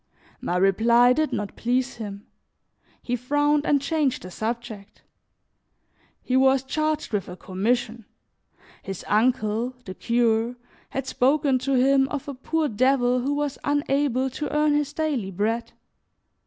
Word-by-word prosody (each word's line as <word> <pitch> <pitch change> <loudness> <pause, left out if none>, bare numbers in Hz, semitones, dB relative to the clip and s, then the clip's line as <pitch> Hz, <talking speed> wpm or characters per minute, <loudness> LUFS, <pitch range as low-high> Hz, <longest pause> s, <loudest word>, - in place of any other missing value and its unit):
My 175 - -1
reply 235 +6 +4
did 310 +2 0
not 205 -1 -4
please 250 +2 -1
him; 205 -3 -7 0.8
he 245 - -1
frowned 290 +4 +1
and 285 - +4
changed 285 -2 -1
the 185 - -9
subject. 220 -1 -6 1.2
He 255 - -1
was 265 0 +4
charged 310 -1 -2
with 205 -2 -1
a 180 - -8
commission; 225 +5 -2 0.8
his 195 -3 -7
uncle, 230 +1 +1
the 185 - -6
cure, 235 +1 +1 0.3
had 270 -1 -4
spoken 270 +1 +2
to 270 +2 -1
him 270 +1 +4
of 285 0 -5
a 285 - -4
poor 310 +4 -1
devil 250 +1 +2
who 275 +4 -1
was 290 -1 -2
unable 275 -2 0
to 300 +3 -4
earn 300 0 +2
his 295 -1 0
daily 290 -11 -2
bread. 220 +5 -2
250 Hz, 140 wpm, -24 LUFS, 225-280 Hz, 1.2 s, reply